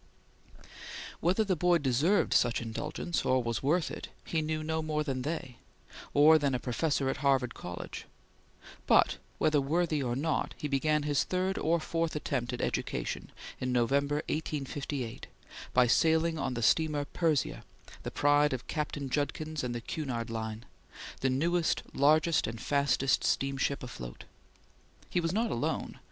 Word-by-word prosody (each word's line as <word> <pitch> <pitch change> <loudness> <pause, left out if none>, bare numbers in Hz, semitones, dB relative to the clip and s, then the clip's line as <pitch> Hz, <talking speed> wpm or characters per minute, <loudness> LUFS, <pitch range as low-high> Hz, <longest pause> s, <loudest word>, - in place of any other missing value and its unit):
Whether 185 +6 +2
the 195 -3 +1
boy 175 +1 +3
deserved 145 +7 +2
such 120 -1 +3
indulgence, 145 +9 -3
or 130 -1 +2
was 115 -1 -2
worth 155 +4 +1
it, - - -6 0.2
he 160 - 0
knew 155 0 -2
no 160 +1 -1
more 155 -1 -1
than 135 -3 -2
they, 135 -4 -4 0.5
or 155 +2 +7
than 140 -3 +1
a - - -1
professor 135 +3 0
at 135 - -1
Harvard 135 -3 +2
College; 90 0 -7 0.8
but - - +5 0.2
whether 150 -2 +3
worthy 155 +1 +1
or 120 -2 -1
not, 155 +3 -1
he 150 - -3
began 150 +2 +1
his 145 -2 +2
third 185 +1 -1
or 170 +2 +2
fourth 165 0 -2
attempt 130 -4 -2
at 125 - -4
education - - -3 0.3
in 130 0 -1
November, 140 +5 +1
1858, 140 -5 -3 0.4
by 125 0 +5
sailing 160 +5 +3
on 130 -2 -2
the 120 - -2
steamer 150 +3 +2
Persia, 155 0 0 0.4
the - - -4
pride 145 0 +3
of 125 - -4
Captain 150 -2 -3
Judkins 155 +3 -2
and 120 -1 -2
the 120 - -3
Cunard 120 -4 -4
Line; 110 0 -4 0.5
the 135 - +1
newest, 165 +6 +1
largest 155 +3 +3
and 110 0 -5
fastest 140 -1 +2
steamship 135 0 0
afloat. - - -8 0.9
He 180 - +2
was 165 -1 0
not 225 +4 0
alone. 120 - -2
145 Hz, 150 wpm, -30 LUFS, 130-160 Hz, 0.9 s, or